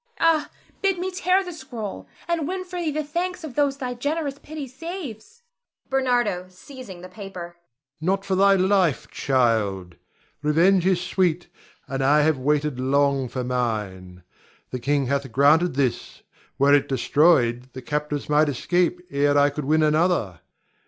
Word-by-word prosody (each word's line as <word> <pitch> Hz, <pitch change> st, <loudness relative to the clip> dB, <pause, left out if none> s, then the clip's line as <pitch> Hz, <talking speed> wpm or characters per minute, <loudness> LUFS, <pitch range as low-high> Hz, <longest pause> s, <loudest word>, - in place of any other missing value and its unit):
Ah, 325 Hz, -2 st, +3 dB, 0.3 s
bid 390 Hz, -2 st, +1 dB
me 370 Hz, +2 st, -3 dB
tear 370 Hz, +1 st, +2 dB
the 360 Hz, -1 st, -7 dB
scroll, 235 Hz, -, -7 dB, 0.2 s
and 335 Hz, -4 st, -1 dB
win 370 Hz, +1 st, -3 dB
for 360 Hz, -1 st, -7 dB
thee 335 Hz, -3 st, -1 dB
the 305 Hz, +1 st, -2 dB
thanks 350 Hz, +4 st, -3 dB
of 305 Hz, -5 st, -7 dB
those 285 Hz, -1 st, +1 dB
thy 255 Hz, -2 st, -4 dB
generous 285 Hz, +2 st, -3 dB
pity 305 Hz, -2 st, -7 dB
saves. 330 Hz, -, -8 dB, 0.5 s
Ber. 245 Hz, -9 st, +1 dB
[seizing 190 Hz, -1 st, -11 dB
the 185 Hz, -, -9 dB
paper]. 185 Hz, -3 st, -9 dB, 0.4 s
Not 195 Hz, +4 st, 0 dB
for 195 Hz, -, -1 dB
thy 195 Hz, +1 st, +5 dB
life, 185 Hz, -5 st, +1 dB
child! 105 Hz, -9 st, 0 dB, 0.4 s
Revenge 170 Hz, +5 st, +3 dB
is 185 Hz, -2 st, +3 dB
sweet, 180 Hz, -2 st, 0 dB, 0.4 s
and 135 Hz, 0 st, -2 dB
I 150 Hz, +2 st, +4 dB
have 155 Hz, -3 st, +2 dB
waited 145 Hz, 0 st, 0 dB
long 140 Hz, 0 st, +1 dB
for 125 Hz, +1 st, -4 dB
mine. 105 Hz, -8 st, -3 dB, 0.5 s
The 125 Hz, -, -3 dB
king 140 Hz, +2 st, 0 dB
hath 135 Hz, 0 st, -2 dB
granted 145 Hz, +5 st, +4 dB
this; 130 Hz, -3 st, -2 dB, 0.3 s
were 140 Hz, +1 st, +4 dB
it 145 Hz, -, +3 dB
destroyed, 130 Hz, -2 st, +2 dB
the 130 Hz, -, -7 dB
captives 150 Hz, +3 st, -3 dB
might 150 Hz, 0 st, +3 dB
escape 175 Hz, +6 st, 0 dB
ere 145 Hz, +1 st, +2 dB
I 145 Hz, 0 st, +4 dB
could 145 Hz, 0 st, -5 dB
win 155 Hz, +2 st, +3 dB
another. 155 Hz, -, +1 dB
175 Hz, 155 wpm, -23 LUFS, -, 0.5 s, thy